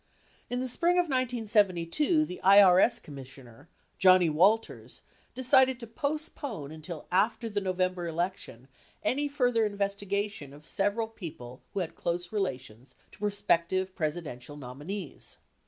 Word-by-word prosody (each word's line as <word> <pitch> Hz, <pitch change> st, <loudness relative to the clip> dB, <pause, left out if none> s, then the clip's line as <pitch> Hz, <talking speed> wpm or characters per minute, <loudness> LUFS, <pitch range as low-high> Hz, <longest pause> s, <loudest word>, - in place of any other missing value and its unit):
In 245 Hz, 0 st, -2 dB
the 260 Hz, -, -2 dB
spring 340 Hz, +8 st, +2 dB
of 355 Hz, -, +4 dB
1972 240 Hz, -, +1 dB
the 180 Hz, -, -8 dB
IRS 200 Hz, +4 st, +6 dB
Commissioner, 135 Hz, -1 st, -12 dB, 0.3 s
Johnnie 185 Hz, -3 st, +6 dB
Walters, 200 Hz, +9 st, +1 dB, 0.3 s
decided 260 Hz, 0 st, +4 dB
to 235 Hz, -, -7 dB
postpone 280 Hz, -, -4 dB
until 160 Hz, +1 st, -7 dB
after 215 Hz, +5 st, +1 dB
the 205 Hz, -2 st, -2 dB
November 185 Hz, -2 st, -1 dB
election 170 Hz, -7 st, -4 dB, 0.4 s
any 290 Hz, +3 st, 0 dB
further 245 Hz, -5 st, +1 dB
investigation 200 Hz, -5 st, -2 dB
of 150 Hz, +1 st, -14 dB
several 205 Hz, +6 st, 0 dB
people 155 Hz, -, -9 dB
who 195 Hz, -, 0 dB
had 170 Hz, -, -4 dB
close 175 Hz, +1 st, -3 dB
relations 130 Hz, -, -4 dB, 0.2 s
to -, -, -18 dB
prospective 190 Hz, -2 st, 0 dB
Presidential 150 Hz, -4 st, -4 dB
nominees. 145 Hz, +7 st, -7 dB
190 Hz, 120 wpm, -29 LUFS, 160-230 Hz, 0.4 s, IRS